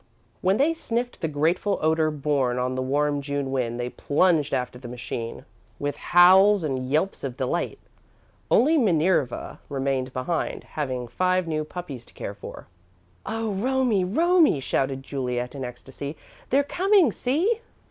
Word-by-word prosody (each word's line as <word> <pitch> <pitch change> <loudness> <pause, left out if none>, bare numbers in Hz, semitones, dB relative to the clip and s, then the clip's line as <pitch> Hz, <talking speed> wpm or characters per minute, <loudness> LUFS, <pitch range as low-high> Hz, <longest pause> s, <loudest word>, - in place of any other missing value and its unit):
When 190 +2 +2
they 300 +5 +3
sniffed 245 -6 -3
the 165 - 0
grateful 165 +7 +1
odour 160 0 +2
borne 140 -4 0
on 125 +1 -1
the 130 - -2
warm 145 +2 0
June 140 -1 -3
wind, 120 -3 -1
they 120 0 -3
plunged 150 -1 +2
after 125 -2 -2
the 125 - -9
machine 120 -1 -6 0.3
with 145 0 -2
howls 190 +4 +6
and 130 -4 -2
yelps 155 +7 0
of 130 -2 -4
delight. 135 +7 -2 0.7
Only 310 +5 +4
Minerva 170 - +1
remained 135 -2 -1
behind, 130 +7 -2
having 130 -5 -4
five 185 +8 +1
new 155 -1 -1
puppies 150 -6 -7
to - - -21
care - - -5
for. - - -10 0.6
"Oh, 225 -1 -2
Romie, 245 -1 +1
Romie!" 325 - +3
shouted 135 0 -1
Juliet, 125 -3 -3
in 135 -2 -5
ecstasy. 135 +4 -7 0.3
"They're 275 +3 +3
coming! 370 - +3
See!" 345 - 0
150 Hz, 145 wpm, -25 LUFS, 130-195 Hz, 0.7 s, howls